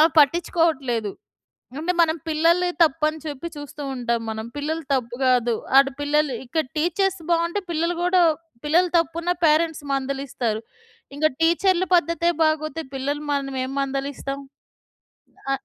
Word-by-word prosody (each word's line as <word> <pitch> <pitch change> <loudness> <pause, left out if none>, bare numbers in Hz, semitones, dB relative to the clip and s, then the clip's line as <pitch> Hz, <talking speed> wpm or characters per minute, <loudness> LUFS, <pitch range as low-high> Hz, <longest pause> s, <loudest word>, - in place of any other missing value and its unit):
ఆమె 320 +1 +6
పట్టిచ్చుకోవట్లేదు. 285 - +1 0.7
అంటే, 345 +4 0
మనం 320 -1 +3
పిల్లలిదే 335 +3 +3
తప్పని 310 0 +1
చెప్పి 295 +1 -5
చూస్తూ 290 0 -8
ఉంటాం 235 -2 -1
మనం. 220 0 -4
పిల్లలు 315 +3 -2
తప్పు 240 -3 -1
గాదు, 245 -2 +3 0.2
ఆడ 275 - +5 0.2
పిల్లలు 290 -2 +1
ఇక్కడ 315 +5 -1
టీచర్స్ 375 +4 +1
బావుంటే 340 +4 +1
పిల్లలు 335 +2 0
గూడా, 360 0 +4 0.4
పిల్లలు 345 +4 +3
తప్పున్నా 335 +2 -1
పేరెంట్స్ 315 0 +2
మందలిస్తారు. 265 -5 -2 0.5
ఇంక 300 +2 0 0.2
టీచర్ల 365 +2 +3
పద్ధతే 335 0 +2
బాగోతే 310 0 0
పిల్లలని 285 +3 -3
మనమేం 270 -2 -2
మందలిస్తాం. 275 0 -3 1.2
ఆగ్ 270 - -7
305 Hz, 125 wpm, -23 LUFS, 270-335 Hz, 1.2 s, ఆమె